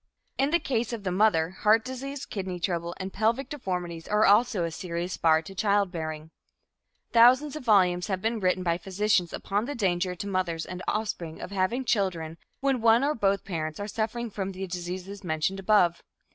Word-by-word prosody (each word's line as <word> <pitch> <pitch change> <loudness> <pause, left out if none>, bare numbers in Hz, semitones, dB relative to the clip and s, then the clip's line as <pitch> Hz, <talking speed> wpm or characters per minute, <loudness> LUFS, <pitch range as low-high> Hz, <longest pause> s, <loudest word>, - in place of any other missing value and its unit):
In 275 +1 +3
the 340 - +4
case 240 -5 -1
of 225 -3 -5
the 185 - -1
mother, 180 -4 +3
heart 215 +3 +3
disease, 270 +2 -5
kidney 185 -3 -5
trouble 170 -1 -2
and 190 0 -6
pelvic 225 +6 0
deformities 180 - -4
are 210 +1 +3
also 210 -2 +4
a 165 - -2
serious 175 +1 -4
bar 160 -1 +3
to 195 - -10
childbearing. 175 -6 -1 0.8
Thousands 255 +5 +6
of 305 - -6
volumes 180 -5 +4
have 190 -3 -1
been 225 +3 -1
written 185 -1 +1
by 170 -1 0
physicians 195 -1 +1
upon 205 +3 -2
the 290 +3 -4
danger 180 -3 0
to 180 - -6
mothers 185 -4 -1
and 180 0 -7
offspring 185 -7 -3
of - - -7
having 200 +7 0
children 170 -7 -1 0.2
when 270 -3 +1
one 230 +2 +5
or 295 +2 +2
both 200 -4 0
parents 155 -4 -4
are 205 - -4
suffering 225 +2 -3
from 195 -1 -4
the 190 +1 -5
diseases 180 +2 -6
mentioned 165 +3 -1
above. 185 -4 +3
195 Hz, 185 wpm, -27 LUFS, 175-220 Hz, 0.8 s, Thousands